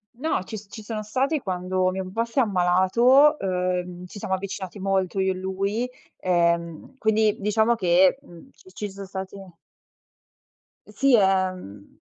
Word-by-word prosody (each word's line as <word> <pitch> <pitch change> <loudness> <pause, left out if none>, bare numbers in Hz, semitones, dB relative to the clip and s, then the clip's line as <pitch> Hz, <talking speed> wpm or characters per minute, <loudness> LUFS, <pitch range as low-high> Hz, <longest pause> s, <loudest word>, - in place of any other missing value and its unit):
No, 270 -5 -1
ci 215 +3 -7
s 205 0 -12
ci 220 - -10
sono 215 0 -4
stati 265 +8 -1
quando 185 -2 -1
mio 190 +1 -3
papà 195 +5 -2
s'è 235 +4 -2
ammalato, 220 - +4
uhm, 180 -1 -2
ci 195 +3 -10
siamo 190 -1 -1
avvicinati 190 0 -6
molto 195 -1 -1
io 190 0 +2
e - - -3
lui, 195 +6 -2 0.3
ehm, 170 +3 0
quindi, 220 -1 +2
diciamo 220 +3 +2
che, 185 +2 +3
mhmm, 170 -1 -15
ci - - -19
ci 210 -2 -5
son 195 0 -9
stati 190 0 -7 1.5
E - - -15
sì, 265 +4 +3
ehm 185 - -1
190 Hz, 155 wpm, -24 LUFS, 185-220 Hz, 1.5 s, ammalato